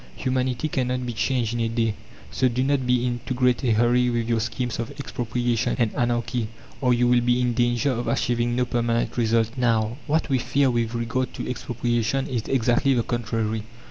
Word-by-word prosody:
Humanity 130 +1 -1
cannot 125 -3 -1
be 120 - -3
changed 120 0 0
in 120 - -2
a 115 -1 0
day, 115 -1 0 0.4
so 130 - +2
do 125 +1 0
not 135 -2 +1
be 125 0 +2
in 120 -1 -1
to 130 - -1
great 125 +1 +2
a 120 -3 +3
hurry 120 +2 +3
with 120 -1 -1
your 115 -1 +1
schemes 120 +2 -3
of 115 - -3
Expropriation 120 -3 -1
and 115 -4 +1
Anarchy, 120 -1 -1 0.3
or 125 -2 +3
you 120 0 +3
will 120 0 +4
be 120 +1 +2
in 125 -1 +1
danger 120 +3 +1
of 120 -1 -3
achieving 120 0 0
no 125 0 +1
permanent 120 -1 0
result." 115 -1 +2
Now, 115 -2 +1
what 160 +2 +1
we 135 -4 +1
fear 130 +2 +2
with 120 -1 -1
regard 115 +2 -2
to - - -5
Expropriation 120 +1 -1
is 120 -4 -3
exactly 130 +1 +2
the 120 - +1
contrary. 115 -2 -2
120 Hz, 200 wpm, -24 LUFS, 115-125 Hz, 0.4 s, will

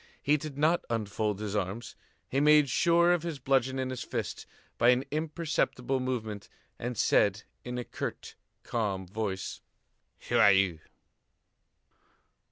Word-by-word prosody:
He 145 +1 +2
did 150 -1 -5
not 160 +4 +2
unfold 105 -2 -1
his 105 -1 -4
arms, 105 +5 -3 0.3
he 135 - 0
made 150 -1 +5
sure 170 +3 +4
of 175 - 0
his 165 -2 -4
bludgeon 130 0 +1
in 130 0 -2
his 130 - -5
fist, - - -4 0.3
by 120 - +5
an 125 +1 +4
imperceptible 150 -4 -1
movement, 110 -5 -4 0.3
and 120 0 -4
said - - +3 0.2
in 125 0 -5
a 125 - -2
curt, - - -6 0.3
calm 100 -5 -2
voice: 95 -1 -4 0.7
"Who - - +2
are 100 - +8
you?" 95 -4 +2
125 Hz, 140 wpm, -29 LUFS, 105-150 Hz, 0.7 s, are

